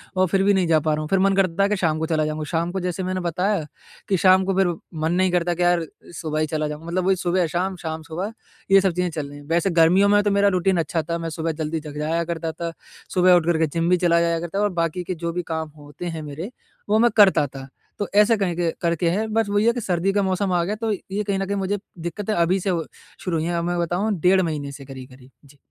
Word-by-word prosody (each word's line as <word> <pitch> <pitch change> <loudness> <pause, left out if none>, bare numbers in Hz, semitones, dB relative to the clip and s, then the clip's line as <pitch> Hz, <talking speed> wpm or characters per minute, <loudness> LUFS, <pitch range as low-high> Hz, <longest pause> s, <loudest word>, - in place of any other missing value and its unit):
और 185 0 +3
फिर 195 +2 +1
भी 205 - +4
नहीं 190 -3 +2
जा 160 -1 +4
पा 155 0 0
रहा 150 - -1
हूँ। 155 - -4
फिर 195 - +2
मन 195 +1 +3
करता 190 -1 +2
था - - +4
कि 210 - 0
शाम 160 -4 0
को 160 - -1
चला 155 -2 0
जाऊँगा। 155 0 -3
शाम 170 +1 0
को 190 - -2
जैसे 180 +1 -3
मैंने 185 0 -2
बताया 180 +1 0 0.4
कि 195 - +3
शाम 185 +1 +5
को 195 - 0
फिर 195 -1 +4 0.3
मन 160 +1 +1
नहीं 185 0 +2
करता 175 0 +1
कि 175 +1 -1
यार 175 -1 +2 0.3
सुबह 155 -2 -3
ही 155 - +1
चला 155 0 -1
जाऊँ 150 +2 -7
मतलब 180 +2 -1
वही 190 - +4
सुबह 180 0 0
शाम, 185 +4 -2
शाम 160 -2 -5
सुबह 180 +7 -5 0.4
ये 195 0 +7
सब 190 - +2
चीज़ें 180 0 0
चल 155 -3 -4
रही 145 - -10
हैं। 145 - -14
वैसे 170 +4 +1
गर्मियों 175 +4 +4
में 205 0 +5
तो 205 - +1
मेरा 200 0 +3
रूटीन 185 +1 +2
अच्छा 165 0 0
था 170 +1 -3
मैं 165 -1 -4
सुबह 165 0 -2
जल्दी 160 +1 -3
जग 150 -1 -9
जाया 160 +3 0
करता 165 -1 -3
था। 170 +1 -5 0.4
सुबह 185 -1 +5
उठ 175 -2 +2
करके 160 0 +1
जिम 165 +3 -1
भी 180 - +4
चला 170 -1 +3
जाया 170 -1 +1
करता 175 +3 -5
था - - +2
और 205 - +2
बाकी 170 +1 -1
के 185 - -3
जो 170 0 -3
भी 180 - -1
काम 160 -1 -3
होते 145 +3 -10
हैं 165 -2 -4
मेरे 150 +8 -6 0.4
वो 215 +1 +4
मैं 240 0 +4
करता 195 -7 +6
था। 135 0 -10 0.3
तो 205 - -1
ऐसे 210 +2 +5
कहके 175 -3 0
करके 170 0 +1
है। 210 +6 0
बस 220 -1 0
वही 205 +1 +2
है 235 - +4
कि 245 - -4
सर्दी 185 0 0
का 205 0 +2
मौसम 190 0 0
आ 175 -1 +2
गया 200 +5 -2
तो 225 0 -2
ये 200 0 -3
कहीं 200 -1 -1
न 195 - -1
कहीं 200 +1 -2
मुझे 195 +1 -1 0.2
दिक्कतें 190 +6 -3
अभी 175 +1 +2
से 190 - -2
हो 170 -3 -1 0.4
शुरू 175 -3 -1
हुई 160 - -1
है। 175 - -1
अब 170 - -1
मैं 175 0 -1
बताऊँ 180 +6 0
डेढ़ 185 +2 +4
महीने 150 -5 -3
से 140 0 -10
करीब-करीब। 130 -1 -12
जी। 140 +1 -19
175 Hz, 280 wpm, -23 LUFS, 160-195 Hz, 0.4 s, ये